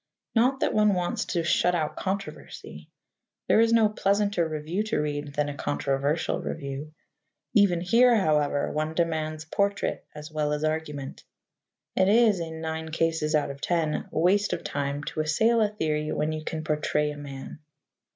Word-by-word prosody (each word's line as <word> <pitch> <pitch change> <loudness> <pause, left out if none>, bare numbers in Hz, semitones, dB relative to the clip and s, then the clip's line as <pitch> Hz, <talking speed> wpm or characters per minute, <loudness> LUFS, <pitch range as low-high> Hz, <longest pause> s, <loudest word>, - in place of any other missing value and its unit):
Not 255 +4 +2
that - - +1
one 210 -2 +4
wants 180 -1 -1
to 170 - -1
shut 175 +2 +2
out 155 -3 -1
controversy. 200 +1 -6 0.6
There - - +5
is 230 0 +4
no 225 -2 +5
pleasanter 200 -3 +1
review 155 +5 -3
to 215 - -1
read 145 -1 -3
than 150 0 +1
a 145 - -3
controversial 140 +1 -1
review. 145 +1 -6 0.6
Even 200 -6 +4
here, 235 +7 +5
however, 150 -7 +1
one 155 +1 -2
demands 155 -2 -1
portrait 200 +4 -1
as 150 +1 -9
well 150 -1 0
as 150 +1 -2
argument. 155 -3 -3 0.7
It 190 0 +3
is, 215 -3 +5
in 160 -1 -5
nine 160 0 -4
cases 160 -1 0
out 150 -2 +1
of 140 0 -11
ten, 165 -3 0
waste 190 +6 +2
of - - -4
time 140 0 -3
to 155 - -5
assail 220 +10 +2
a 210 - +3
theory 155 -6 -2
when 150 +1 0
you 155 0 -4
can 155 0 -4
portray 150 -1 0
a - - -7
man. 140 0 -8
160 Hz, 165 wpm, -26 LUFS, 150-195 Hz, 0.7 s, There